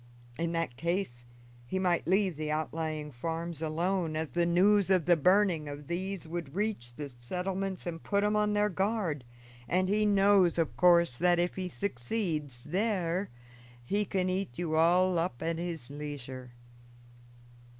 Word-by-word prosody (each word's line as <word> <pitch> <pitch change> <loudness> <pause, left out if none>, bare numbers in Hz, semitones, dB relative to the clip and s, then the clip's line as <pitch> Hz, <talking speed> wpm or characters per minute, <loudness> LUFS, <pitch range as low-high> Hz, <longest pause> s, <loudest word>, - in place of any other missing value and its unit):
In 170 0 0
that 165 -8 -2
case 170 -9 -2 0.4
he 190 - -2
might 180 -2 +1
leave 190 -1 +2
the 155 +1 -4
outlying 155 -1 -2
farms 165 +5 -4
alone, 165 +1 -1
as 160 -1 -2
the 175 -1 +1
news 195 +3 +4
of 185 -5 +3
the 175 - +5
burning 180 -2 +3
of 145 0 -7
these 185 +2 -4
would 165 -3 -5
reach 195 - -2
the 145 +1 -5
settlements 185 +9 -4
and 165 -2 -4
put 200 0 +1
'em 210 0 +2
on 210 0 +2
their 210 0 +3
guard, 190 - -1 0.4
and 185 +6 +1
he 210 +1 +3
knows, 195 -3 +4
in 165 - +3
course, 170 -7 +4
that 175 0 +4
if 175 +1 +1
he 185 -1 -4
succeeds 150 - -3
there 185 0 -1 0.6
he 205 +11 +1
can 190 -2 -1
eat 185 -8 -2
you 165 -3 -1
all 175 +2 +4
up 165 -8 -2
at 165 0 -1
his 165 -7 -5
leisure." 135 -4 -7
175 Hz, 160 wpm, -30 LUFS, 155-190 Hz, 0.6 s, the